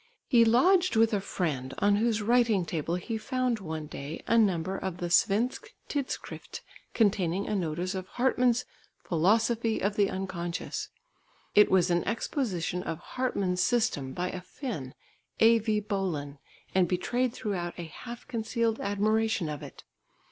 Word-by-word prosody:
He 235 -3 +5
lodged 350 +9 +4
with 225 0 +4
a 200 - +1
friend 145 -9 -3
on 205 0 +3
whose 220 -1 +1
writing 230 -4 +3
table 165 0 -2
he 220 +5 -3
found 255 -1 -1
one 160 -4 -5
day 145 +1 -7
a 230 - +2
number 190 -5 +2
of 190 -2 -4
the 175 -1 -4
Svensk 220 +7 +2
Tidskrift 280 -3 -5 0.3
containing 195 -4 +2
a - - -1
notice 175 +1 -2
of 190 -1 -5
Hartmann's 250 0 +2 0.4
Philosophy 220 +6 +2
of 205 +2 -1
the 200 -1 +3
Unconscious. 185 -2 -4 0.6
It 210 - +6
was 180 -1 +3
an 175 0 +2
exposition 195 - -2
of 165 -2 -4
Hartmann's 190 -4 -1
system 220 - +1
by 180 +1 -2
a 185 - -6
Finn, 180 - -6 0.4
A.V. 225 -1 +4
Bolin, 175 -9 -3 0.3
and 185 -2 +4
betrayed 240 +8 0
throughout 190 -7 -3
a 175 - -5
half 235 +9 -9
concealed 230 -1 -1
admiration 210 -2 +1
of 150 -2 -5
it. - - -10
200 Hz, 145 wpm, -29 LUFS, 175-230 Hz, 0.6 s, It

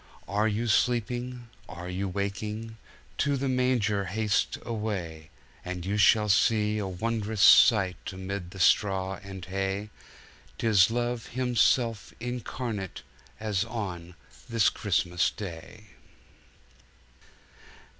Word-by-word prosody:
Are 105 +4 +1
you 110 +2 -1
sleeping, 120 +2 0 0.2
are 90 0 -7
you 95 +2 -3
waking? 105 +3 -4 0.4
To 140 -1 +2
the 135 +1 -2
Manger 125 -6 +1
haste 105 +2 0
away, 95 -9 -4 0.3
And 90 -1 -5
you 100 +2 -1
shall 105 0 +5
see 105 +1 +3
a 100 - -2
wond'rous 105 +2 -1
sight 95 -6 +5
Amid 95 -1 -5
the 95 - -11
straw 95 0 +2
and 95 -2 -8
hay.— 95 +2 -3 0.7
'Tis 105 -4 +4
Love 120 0 -2
Himself 120 -2 +1
Incarnate 120 -4 -5 0.4
As 105 -3 0
on 95 -7 -6 0.3
this 115 -2 +3
Christmas 90 -3 0
Day! 100 +3 -9
105 Hz, 105 wpm, -28 LUFS, 95-115 Hz, 0.7 s, shall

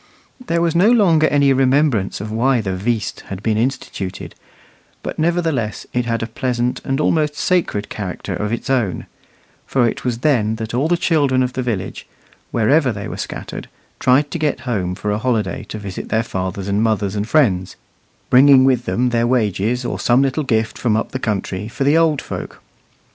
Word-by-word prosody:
There 170 -7 0
was 165 -2 +1
no 185 +6 +5
longer 175 -10 +4
any 140 -2 +3
remembrance 130 -5 +2
of 105 +2 -6
why 125 +3 +2
the 95 -4 -2
"veast" 110 +2 -2
had 95 +1 -7
been 110 -1 +1
instituted, 110 -5 -3 0.7
but - - -5
nevertheless 160 - 0
it 125 -1 0
had 115 -1 -1
a - - 0
pleasant 125 +1 -2
and 135 +1 -1
almost 150 -1 +1
sacred 160 - 0
character 95 -4 -5
of 105 0 -3
its 115 - -3
own; 120 -9 0 0.6
for 125 -3 +2
it - - -3
was 125 -2 -1
then 110 -7 +2
that 110 0 -6
all 130 +6 +1
the 175 +1 +2
children 145 -7 +2
of 125 0 -2
the 130 - -2
village, 115 -7 -4 0.4
wherever 130 +4 +2
they 105 -1 -6
were - - -6
scattered, - - -6 0.3
tried 135 +3 +3
to 170 - -3
get 150 -4 0
home 100 -8 -2
for 105 +2 -3
a 105 - -1
holiday 110 -5 -1
to - - -7
visit 100 -3 -7
their 110 +1 +1
fathers 95 -2 -4
and 100 +1 +1
mothers 105 -3 0
and 105 +2 -2
friends, 95 - +2 0.6
bringing 130 +1 +7
with 125 -2 +2
them 125 +1 +1
their 120 0 +1
wages 120 0 0
or 120 - -3
some 125 +3 +3
little 135 +3 0
gift 110 -4 -1
from 110 -3 +1
up 110 - -2
the 130 - -3
country 105 -3 -3
for 120 +4 -3
the 145 +3 +3
old 160 -4 +2
folk. - - -7
120 Hz, 190 wpm, -19 LUFS, 105-140 Hz, 0.7 s, bringing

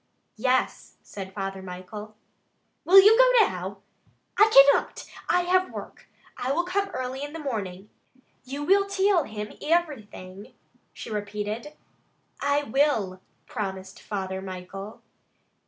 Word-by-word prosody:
"Yes," 255 +3 0
said 190 -2 -8
Father 195 -1 -5
Michael. 190 +4 -9 0.7
"Will 380 +3 +9
you 420 +3 +7
go - - +6
now?" 190 +2 -6 0.5
"I 420 +1 +6
cannot! 275 -3 +5 0.2
I 360 - +3
have 370 +1 +2
work. - - -10 0.3
I 255 - -2
will 335 +5 +1
come 390 +3 -1
early 255 -4 -5
in 290 +1 -6
the - - -5
morning." 210 - -5 0.5
"You 275 +3 -6
will 395 +5 +3
till 390 -4 +2
him 210 -1 -6
ivirything?" 215 - -3 0.4
she - - -9
repeated. 210 +6 -4 0.7
"I 285 +1 +1
will," 220 -8 0 0.2
promised 190 -2 -6
Father 190 -2 -4
Michael. 190 +2 -8
225 Hz, 120 wpm, -26 LUFS, 195-325 Hz, 0.7 s, Will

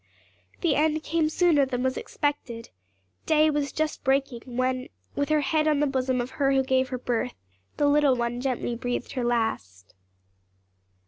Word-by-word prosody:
The 330 -4 +2
end 310 +1 +1
came 320 -1 +1
sooner 320 -3 +3
than 255 -2 -2
was 260 0 0
expected; 260 -6 -3 0.6
day 310 0 +4
was 290 -1 -1
just 310 0 -2
breaking 270 -3 +1 0.2
when, 255 0 0 0.3
with 285 +1 -1
her 305 -1 +3
head 305 +2 +1
on 300 -2 +3
the 295 - +3
bosom 260 -2 0
of 245 +1 -3
her 275 -1 +1
who 270 0 +3
gave 260 0 +1
her 255 - -3
birth, 245 0 -2 0.4
the 295 - +2
little 285 -2 +4
one 240 0 -2
gently 250 -2 -2
breathed 245 0 -3
her 255 - -2
last. 100 - -2
265 Hz, 170 wpm, -26 LUFS, 245-295 Hz, 0.6 s, day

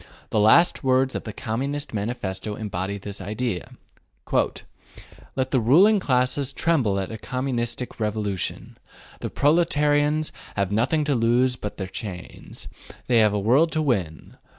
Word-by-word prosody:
The 110 - +2
last 110 +14 +5
words 130 0 +2
of - - -5
the 110 - -5
Communist 135 +7 -3
Manifesto 105 -2 -3
embody 100 -2 -4
this 100 +1 -7
idea 105 -3 -3 1.7
Let 130 -1 -1
the 130 - +3
ruling 180 - +5
classes 130 -2 0
tremble 130 -14 +1
at 95 +1 -4
a 110 - -6
Communistic 125 -1 -3
revolution. 105 -4 -3 0.4
The - - -4
proletarians 150 -1 +2 0.2
have 100 -1 -1
nothing 130 +9 +1
to 145 -1 +1
lose 125 +1 +2
but 105 -4 -6
their 95 - -3
chains. 95 -2 -8 0.4
They 120 -2 +3
have 105 -1 +5
a - - +1
world 135 +11 +3
to 155 - +1
win. 95 - -2
120 Hz, 140 wpm, -24 LUFS, 105-140 Hz, 1.7 s, last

